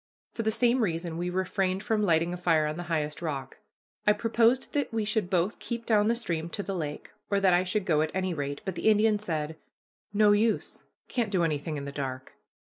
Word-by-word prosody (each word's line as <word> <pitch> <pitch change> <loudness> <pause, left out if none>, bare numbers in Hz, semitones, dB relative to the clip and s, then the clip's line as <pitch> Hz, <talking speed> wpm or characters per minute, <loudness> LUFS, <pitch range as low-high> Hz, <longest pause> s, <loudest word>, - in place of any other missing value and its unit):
For - - -3
the 220 - +1
same 240 +3 +2
reason 170 -4 -1
we 175 +2 -2
refrained 190 +1 -1
from 220 -3 +1
lighting 170 -3 +2
a - - -4
fire 165 -3 +2
on 150 0 -2
the 175 - -5
highest 155 -1 -1
rock. 140 -5 -4 0.5
I 210 - +7
proposed 230 +3 +2
that 290 -1 0
we 225 -2 -1
should 210 -3 0
both 185 +3 0
keep 235 -1 -5
down 210 -2 +3
the 230 - +3
stream 170 -8 -3
to 200 - -4
the 195 - -3
lake, 150 -5 -5 0.2
or 200 - +2
that 190 -2 +4
I 175 +1 +4
should 185 +2 -1
go 155 -4 +3
at 155 - 0
any 185 -1 -1
rate, 145 -2 -4
but 190 - -2
the 220 - +2
Indian 215 0 +4
said: 160 -5 -3 0.5
"No 210 0 +5
use, 215 +2 +1 0.3
can't 235 -4 -1
do 185 -4 +1
anything 155 -1 -1
in 140 - -5
the 140 - -5
dark. 130 -2 -5
185 Hz, 220 wpm, -28 LUFS, 160-215 Hz, 0.5 s, I